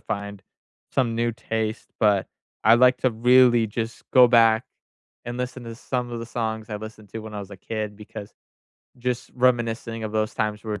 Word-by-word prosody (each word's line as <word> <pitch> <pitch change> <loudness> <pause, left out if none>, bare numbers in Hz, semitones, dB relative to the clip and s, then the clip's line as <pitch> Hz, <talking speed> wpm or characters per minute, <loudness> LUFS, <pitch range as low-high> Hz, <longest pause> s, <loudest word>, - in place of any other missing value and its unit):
find 100 -1 -5 0.5
some 125 -4 +1
new 120 0 +1
taste. 110 -1 -3
But 100 -3 +3 0.4
I 110 +2 +8
like 125 +1 +5
to 130 - +2
really 120 0 +5
just 115 +1 -5
go 125 -2 +8
back 115 -1 +5 0.6
and 120 +1 -5
listen 125 0 -4
to 115 -1 -7
some 125 0 -3
of 115 - -4
the 115 - -6
songs 110 -2 -3
I 105 - -2
listened 110 -1 -10
to 115 - -6
when 110 -1 -9
I 105 - -4
was 100 0 -9
a 100 - -9
kid 105 +1 -5
because 105 -1 -9 0.7
just 125 0 -3
reminiscing 115 -2 0
of 110 - -4
those 110 0 -1
times 105 -1 -2
were 105 -1 -4
115 Hz, 190 wpm, -24 LUFS, 110-120 Hz, 0.7 s, I